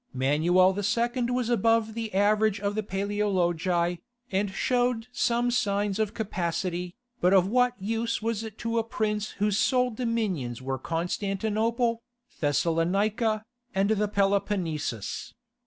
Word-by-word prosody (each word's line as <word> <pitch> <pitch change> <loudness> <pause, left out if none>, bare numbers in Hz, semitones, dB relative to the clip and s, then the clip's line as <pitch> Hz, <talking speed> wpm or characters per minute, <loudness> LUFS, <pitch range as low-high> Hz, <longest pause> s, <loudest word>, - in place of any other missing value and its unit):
Manuel 160 +8 +4
II. 235 +5 0
was 245 -1 0
above 225 0 +2
the 225 -1 -4
average 210 +1 +3
of 200 0 -1
the 215 - -1
Paleologi, 185 -4 0 0.3
and 195 +1 +1
showed 245 +2 0
some 240 0 +1
signs 205 -2 0
of 215 -2 -1
capacity, 180 -3 -2 0.2
but 180 +2 +4
of 185 -2 +5
what 245 +2 +2
use 225 +3 -1
was 225 0 -2
it 220 -1 -8
to 230 0 -1
a - - 0
prince 215 -1 -2
whose 205 0 +1
sole 250 -1 +2
dominions 215 - -2
were 130 0 -3
Constantinople, 215 - -1 0.4
Thessalonica, 195 - +1 0.3
and 195 +2 +2
the 210 -1 +2
Peloponnesus? 195 - -1
205 Hz, 125 wpm, -27 LUFS, 185-225 Hz, 0.4 s, of